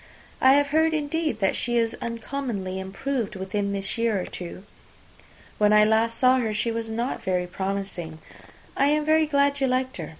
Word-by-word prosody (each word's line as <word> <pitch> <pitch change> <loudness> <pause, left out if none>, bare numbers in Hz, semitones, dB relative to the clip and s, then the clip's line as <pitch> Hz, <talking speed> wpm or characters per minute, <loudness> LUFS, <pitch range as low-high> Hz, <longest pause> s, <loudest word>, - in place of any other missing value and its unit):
"I 260 +1 +7
have 285 0 +3
heard, 320 +2 +2
indeed, 305 -5 -2
that 195 - +2
she 240 0 0
is 230 0 +1
uncommonly 230 -5 -4
improved 210 +4 -3
within 200 +2 -2
this 195 +3 -2
year 230 -4 +1
or 180 - -3
two. 180 +1 -8 1.0
When 210 0 +4
I 210 0 +6
last 225 +1 +2
saw 255 +1 +4
her, 220 -3 -1
she 230 +2 0
was 225 0 -3
not 235 +3 -3
very 180 -1 0
promising. 190 -3 -4 0.6
I 275 - +3
am 300 +1 +2
very 315 0 +3
glad 280 -1 +2
you 270 - +2
liked 255 +1 -1
her. 160 -4 -6
230 Hz, 180 wpm, -25 LUFS, 195-275 Hz, 1.0 s, I